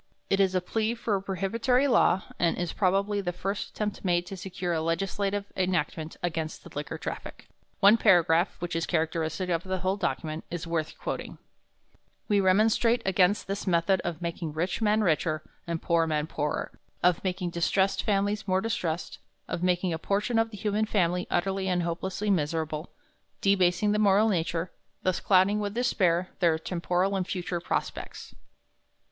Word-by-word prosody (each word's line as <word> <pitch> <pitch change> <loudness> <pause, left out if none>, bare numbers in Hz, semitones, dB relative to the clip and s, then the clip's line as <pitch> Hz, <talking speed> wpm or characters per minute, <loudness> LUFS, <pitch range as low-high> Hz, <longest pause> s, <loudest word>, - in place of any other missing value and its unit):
It 195 - +3
is 190 -1 +3
a 185 - +2
plea 220 +5 -1
for 230 -2 -2
a 195 - -1
prohibitory 230 +8 +1
law, 200 -6 +4 0.2
and 170 -1 +2
is, 175 -1 -2
probably, 200 +1 +1
the 175 -2 -2
first 195 +3 -3
attempt 210 -1 -4
made 175 -2 +1
to 195 - -7
secure 180 -1 -4
a 160 - 0
legislative 195 +4 -1
enactment 170 -3 -1
against 160 -2 -3
the - - -12
liquor 150 +2 -4
traffic. - - -7 0.3
One 205 +3 +7
paragraph, 175 -4 +4
which 175 -1 -4
is 165 -1 -1
characteristic 165 +2 -1
of 165 0 0
the 190 0 -2
whole 190 +1 0
document, 155 -2 -2
is 175 0 -4
worth 165 -2 -2
quoting: - - -5 0.9
"We 205 -2 +3
remonstrate 220 +5 +3
against 190 +1 +3
this 195 +1 -4
method 180 +2 +2
of 175 0 -4
making 170 -2 -3
rich 175 +7 -2
men 215 0 +3
richer 155 -4 +1 0.2
and 170 -1 -2
poor 165 0 +2
men 155 -1 0
poorer; 150 -2 -2 0.3
of 180 -2 +3
making 180 -2 -2
distressed 190 +3 +1
families 205 0 0
more 185 0 +2
distressed; 180 -6 -3 0.3
of - - -3
making 180 -1 +1
a 160 - -3
portion 210 +6 0
of 225 0 +1
the 210 - -9
human 210 +2 0
family 180 -3 +1
utterly 190 +2 0
and 180 -1 +1
hopelessly 190 +4 -2
miserable, 155 -2 -1 0.5
debasing 195 +1 +3
the 210 - +1
moral 210 +1 +4
nature, 170 -2 -1
and - - -43
thus 185 -2 +1
clouding 195 +2 +4
with 205 0 -3
despair 185 -7 +1
their 170 -4 +3
temporal 180 +3 -1
and 185 -2 -1
future 180 -2 -3
prospects." 170 - -4
185 Hz, 170 wpm, -28 LUFS, 170-200 Hz, 0.9 s, One